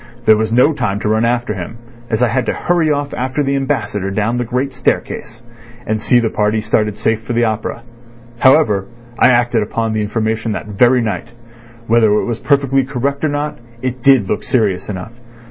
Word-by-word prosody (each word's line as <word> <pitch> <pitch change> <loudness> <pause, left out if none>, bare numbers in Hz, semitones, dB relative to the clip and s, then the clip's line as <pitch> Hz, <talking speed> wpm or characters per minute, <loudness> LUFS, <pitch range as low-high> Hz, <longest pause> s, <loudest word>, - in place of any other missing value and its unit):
There 110 - +7
was 110 +1 -1
no 125 +7 +4
time 115 -8 -2
to - - -2
run 110 +1 +2
after 120 -2 0
him, 100 +4 -7 0.3
as 115 +2 +1
I 120 - +3
had 120 +1 -1
to - - +1
hurry 170 -3 +1
off 145 -1 -1
after 130 +3 -1
the 140 0 0
Ambassador 110 -8 -2
down 110 +4 -1
the - - 0
great 125 +3 -2
staircase, 120 -2 -3 0.4
and 110 0 -1
see 125 +2 +3
the 115 -2 0
party 105 +1 +1
started 105 -1 0
safe 110 0 0
for 120 +1 -5
the 120 0 +2
opera. 110 +1 -3 0.6
However, 120 -9 +4 0.3
I - - +6
acted 120 -2 +3
upon 110 +1 -2
the 110 - 0
information 110 +1 -1
that - - -5
very 120 +5 +3
night. 115 +1 -4 0.5
Whether 115 -2 +3
it 105 - +1
was 115 -2 -3
perfectly 135 -2 +2
correct 140 +2 -3
or 155 - +2
not, 145 +1 -3 0.2
it 130 -1 -3
did 130 -6 +4
look - - -1
serious 105 -7 0
enough. 105 +3 -6
115 Hz, 195 wpm, -16 LUFS, 110-130 Hz, 0.6 s, There